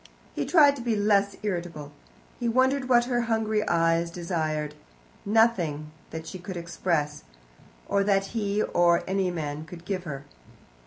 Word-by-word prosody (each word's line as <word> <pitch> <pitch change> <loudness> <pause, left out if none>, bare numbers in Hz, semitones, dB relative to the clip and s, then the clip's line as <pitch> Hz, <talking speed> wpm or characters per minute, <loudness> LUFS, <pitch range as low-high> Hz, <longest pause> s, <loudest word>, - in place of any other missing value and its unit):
He - - -2
tried 290 -5 +6
to - - -6
be 235 -2 0
less 205 -1 +2
irritable. 170 -7 -4 0.5
He 240 -2 0
wondered 260 +2 +2
what 240 -1 +5
her 245 -1 0
hungry 220 -1 +1
eyes 165 0 +2
desired 160 -3 -2 0.5
nothing 180 -9 +2 0.2
that 160 0 -7
she 185 +3 -7
could 185 0 -6
express, 170 - -2 0.6
or 200 0 +2
that 195 -1 +2
he 210 -2 0
or 175 -1 +3
any 190 -1 0
man 155 -3 -4
could 170 +1 -11
give 185 -2 -3
her. 140 -3 -6
185 Hz, 150 wpm, -27 LUFS, 165-215 Hz, 0.6 s, tried